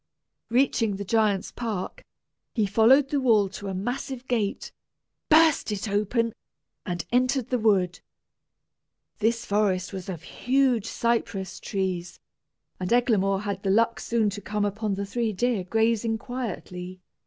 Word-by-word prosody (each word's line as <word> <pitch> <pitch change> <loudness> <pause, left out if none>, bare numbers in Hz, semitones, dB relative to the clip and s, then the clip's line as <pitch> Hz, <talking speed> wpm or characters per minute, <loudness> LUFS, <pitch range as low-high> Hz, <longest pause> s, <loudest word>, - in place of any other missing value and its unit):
Reaching 230 -4 +2
the 200 +1 -5
giant's 210 -2 +1
park, 225 - -4 0.5
he 220 -3 +2
followed 230 +7 +5
the 285 -1 0
wall 215 -6 +4
to 200 +1 -8
a 190 - -3
massive 255 +5 -4
gate, 220 -5 -1 0.6
burst 315 -6 +5
it 205 +1 -3
open, 215 +3 0 0.5
and 175 -3 -3
entered 250 0 +1
the 250 - +1
wood. 195 -5 +2 1.2
This 230 +2 +1
forest 200 -2 0
was 190 -1 -6
of 170 -4 -6
huge 255 0 +1
cypress 225 -5 -1
trees, 185 -3 -3 0.6
and 180 -1 -3
Eglamour 205 -5 +2
had 200 -2 -3
the 195 - -1
luck 230 +4 +3
soon 225 -3 +1
to 205 +1 -6
come 210 +1 -1
upon 205 0 -2
the 200 +1 -3
three 225 +1 -1
deer 225 0 0
grazing 225 +3 +1
quietly. 185 -7 -6
215 Hz, 140 wpm, -26 LUFS, 195-240 Hz, 1.2 s, followed